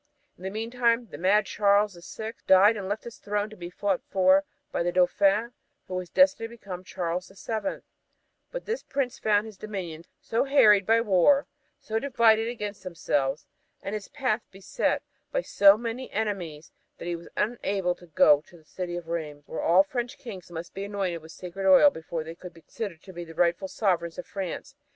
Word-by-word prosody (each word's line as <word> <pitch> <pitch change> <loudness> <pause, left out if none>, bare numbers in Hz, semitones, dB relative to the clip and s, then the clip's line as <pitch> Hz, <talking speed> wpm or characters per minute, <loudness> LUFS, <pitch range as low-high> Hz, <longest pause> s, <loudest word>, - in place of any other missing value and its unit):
In - - -22
the 190 - -3
meantime 230 +2 0
the - - -7
mad 195 +4 +3
Charles 205 0 +3
the 175 - -13
Sixth 220 +5 -8
died 195 +4 +7
and 195 -2 -5
left 205 +2 -2
his 235 - -10
throne 205 +1 -2
to - - -10
be 175 -3 -7
fought 190 +1 -1
for 190 +1 +4 0.3
by - - -1
the 175 +1 +1
Dauphin, 195 +5 +3 0.4
who - - -7
was 185 -1 -3
destined 280 -5 +3
to 235 - -12 0.2
be - - -17
Charles 180 0 -3
the 195 - -18
Seventh 225 +7 -4 0.7
but - - -6
this 460 +3 -2
prince 270 -3 -2
found 210 0 +2
his 215 -3 -10
dominions 180 -6 -6
so 230 +4 0
harried 210 -8 +5
by 225 +1 +5
war, 230 +7 +4 0.3
so 220 0 -2
divided 230 -4 +3
against 210 -4 -5
themselves, 150 -6 -1 0.4
and 195 - -4
his 210 -2 -4
path 255 -6 -1
beset 195 0 -1 0.3
by - - 0
so 200 0 +6
many 235 +3 -5
enemies 180 -8 -3 0.3
that - - -8
he 175 0 -2
was 170 0 -10
unable 200 -5 0
to 175 - -17
go 150 -2 +5
to 175 - -16
the 160 - -22
city 175 +1 -5
of 170 -2 -8
Rheims, 155 -3 -4
where - - -5
all 180 +3 +5
French 240 +4 -4
kings 195 -8 -9
must 170 0 -7
be 195 - -5
anointed 195 -5 -2
with 160 +1 -12
sacred 185 +2 -5
oil 285 +10 +8
before 160 - -5
they 160 +1 -7
could 175 0 -11
be 165 - -15
considered 180 -1 -6
as 175 -2 -8
the 165 - -11
rightful 175 +3 +1
sovereigns 175 -5 0
of 180 - -6
France. 200 - -5
195 Hz, 195 wpm, -27 LUFS, 175-220 Hz, 0.7 s, oil